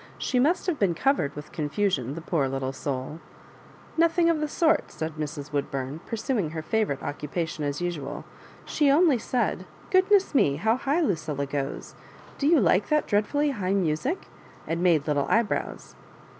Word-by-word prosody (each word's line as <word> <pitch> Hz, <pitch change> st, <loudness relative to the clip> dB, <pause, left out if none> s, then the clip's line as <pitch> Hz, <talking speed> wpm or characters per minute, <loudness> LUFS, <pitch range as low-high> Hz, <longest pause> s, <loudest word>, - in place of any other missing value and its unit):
She 250 Hz, -, 0 dB
must 315 Hz, +8 st, +2 dB
have 355 Hz, -6 st, -1 dB
been 185 Hz, -5 st, +2 dB
covered 265 Hz, -, +1 dB
with 150 Hz, +1 st, -9 dB
oonfusioB, 150 Hz, -, -1 dB
the 165 Hz, -, -6 dB
poor 160 Hz, -4 st, 0 dB
little 135 Hz, 0 st, -3 dB
souL" 135 Hz, +2 st, -4 dB, 0.8 s
Nothing 335 Hz, +1 st, +4 dB
of 320 Hz, -, -1 dB
the 305 Hz, -, -1 dB
sort," 320 Hz, +2 st, +1 dB
said 160 Hz, 0 st, -4 dB
Mrs. 150 Hz, -1 st, -5 dB
Woodbum. 140 Hz, 0 st, -3 dB
pursuing 225 Hz, -, -1 dB
her 160 Hz, 0 st, -5 dB
favourite 185 Hz, -5 st, -1 dB
occupation 155 Hz, +2 st, -3 dB
as 145 Hz, +2 st, -2 dB
usual. 175 Hz, -5 st, -4 dB, 0.2 s
" -, -, -22 dB
She 295 Hz, -2 st, +4 dB
only 295 Hz, -3 st, +4 dB
said, 245 Hz, +2 st, -1 dB
' -, -, -23 dB
Goodness 385 Hz, 0 st, +4 dB
me 145 Hz, -, +3 dB
I -, -, -6 dB
how 220 Hz, +8 st, +2 dB
high 280 Hz, +6 st, 0 dB
Lucilla 155 Hz, -, -1 dB
goes! 140 Hz, -1 st, -4 dB, 0.5 s
Do 280 Hz, -, +1 dB
you 325 Hz, -1 st, +5 dB
like 190 Hz, -2 st, +3 dB
that 300 Hz, -1 st, +2 dB
dreadfully 285 Hz, +8 st, +1 dB
high 195 Hz, -6 st, -1 dB
music?* 190 Hz, -, -1 dB, 0.4 s
and 165 Hz, +1 st, -2 dB
made 165 Hz, -5 st, +3 dB
little 145 Hz, -2 st, 0 dB
eyebrows." 230 Hz, -1 st, -1 dB
180 Hz, 170 wpm, -26 LUFS, -, 0.8 s, you